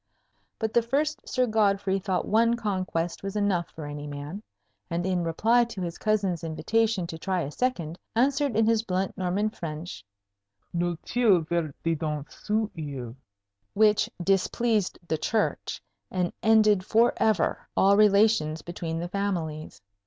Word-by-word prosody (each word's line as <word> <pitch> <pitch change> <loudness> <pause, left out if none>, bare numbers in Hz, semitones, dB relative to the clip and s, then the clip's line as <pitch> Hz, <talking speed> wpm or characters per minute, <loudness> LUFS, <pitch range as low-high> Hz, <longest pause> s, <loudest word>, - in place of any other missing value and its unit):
But 220 -1 -2
the 235 - +5
first 290 +6 -1
Sir 255 -1 +2
Godfrey 200 -3 +1
thought 185 -2 -1
one 230 +2 +3
conquest 185 -6 -2
was 195 +1 -5
enough 195 -5 0
for 155 - -8
any 145 0 -6
man; 145 +7 -6 0.5
and 170 +1 -2
in 180 -2 0
reply 225 +9 +3
to 230 -5 -7
his 170 -1 -5
cousin's 200 -6 0
invitation 215 +4 0
to 165 -1 -7
try 185 +1 -1
a 145 - -4
second, 175 - -2 0.2
answered 275 +1 +2
in 220 +1 +4
his 225 -1 +3
blunt 190 -3 -2
Norman 195 +3 0
French, 155 - -7 0.7
"Nul 175 0 -1
tiel 220 -8 +3
verte 160 -2 -2
dedans 155 -3 -1
ceot 215 0 -2
oyle," 130 -6 -6 0.6
which 210 0 +4
displeased 200 +2 +1
the 160 -2 -1
Church, 215 +6 -1 0.3
and 180 -2 -1
ended 215 -3 +4
forever 220 -3 +2
all 200 +1 +5
relations 200 -6 +4
between 170 -1 -4
the 170 +1 -3
families. 165 - -3
190 Hz, 145 wpm, -27 LUFS, 165-220 Hz, 0.7 s, the